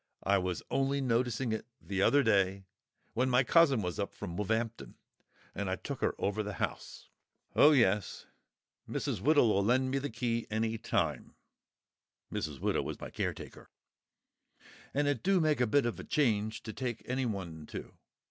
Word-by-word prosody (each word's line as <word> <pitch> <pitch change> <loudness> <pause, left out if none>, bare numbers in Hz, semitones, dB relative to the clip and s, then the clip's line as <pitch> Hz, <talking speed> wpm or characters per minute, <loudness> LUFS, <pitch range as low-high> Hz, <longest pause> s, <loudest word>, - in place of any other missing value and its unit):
I 100 0 +3
was 90 -1 -3
only 135 +1 +1
noticing 125 -1 0
it 110 +1 -3 0.2
th'other 100 +9 +3
day, 100 -3 +2 0.5
when 130 +2 +1
my 125 +1 +4
cousin 140 -6 +4
was 90 -3 -3
up - - -3
from 85 - -6
Woolv'ampton, 110 +3 -2 0.6
and 100 -1 -3
I 95 - 0
took - - -6
her - - +1
over 105 +2 -1
the 105 -1 -4
house.... - - -5 0.5
Oh, 150 - +8
yes, 105 -8 +2 0.6
Mrs. - - -2
Widow'll 120 -7 +4
lend 130 +4 +2
me 135 - +1
the 145 +1 -3
key 115 0 -2
any 110 +1 -1
time" 115 - -1 1.0
(Mrs. 75 -4 -3
Widow - - 0
is - - -6
my - - -7
caretaker), - - -5 1.2
"and 145 +1 +1
it 145 - 0
do 190 0 +3
make 155 -5 +2
a 125 - +3
bit 140 +4 +3
of 120 - -2
a - - -6
change 110 -6 0
to 110 - -6
take 125 -4 -4
anyone 100 -12 -3
to. - - -8
115 Hz, 160 wpm, -32 LUFS, 100-130 Hz, 1.2 s, Oh